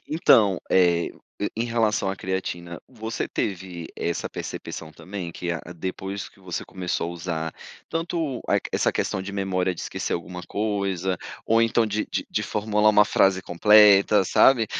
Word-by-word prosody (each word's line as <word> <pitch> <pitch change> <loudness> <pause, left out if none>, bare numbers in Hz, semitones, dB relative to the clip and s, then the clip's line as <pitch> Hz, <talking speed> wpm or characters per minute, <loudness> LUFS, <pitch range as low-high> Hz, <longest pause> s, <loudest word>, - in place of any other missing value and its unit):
Então, 110 - +4
eh, 85 -2 +3 0.5
em 115 - 0
relação 115 -4 +1
à 95 - -3
creatina, 85 -2 -4
você 115 -3 -4
teve 90 -4 -4
essa 85 - -2
percepção 80 -1 -6
também 90 +1 -7
que 90 +1 -4
a 85 - -3 0.2
depois 95 +3 -5
que - - -25
você 90 -2 -5
começou 90 -2 -3
a - - -6
usar, 80 -2 -4 0.3
tanto 165 -5 -2
a - - +3
qu - - -7
essa - - +2
questão - - -1
de 100 - -6
memória 95 -2 0
de - - -8
esquecer - - -3
alguma 90 +1 -4
coisa, 100 -3 -1 0.3
ou 115 +1 +4
então 115 0 +3
de 105 0 -2
de - - -2
de - - 0
formular 105 0 +2
uma 105 0 +6
frase 95 -2 +3
completa, 105 +2 +6
sabe 115 +4 +5
95 Hz, 160 wpm, -24 LUFS, 90-105 Hz, 0.5 s, uma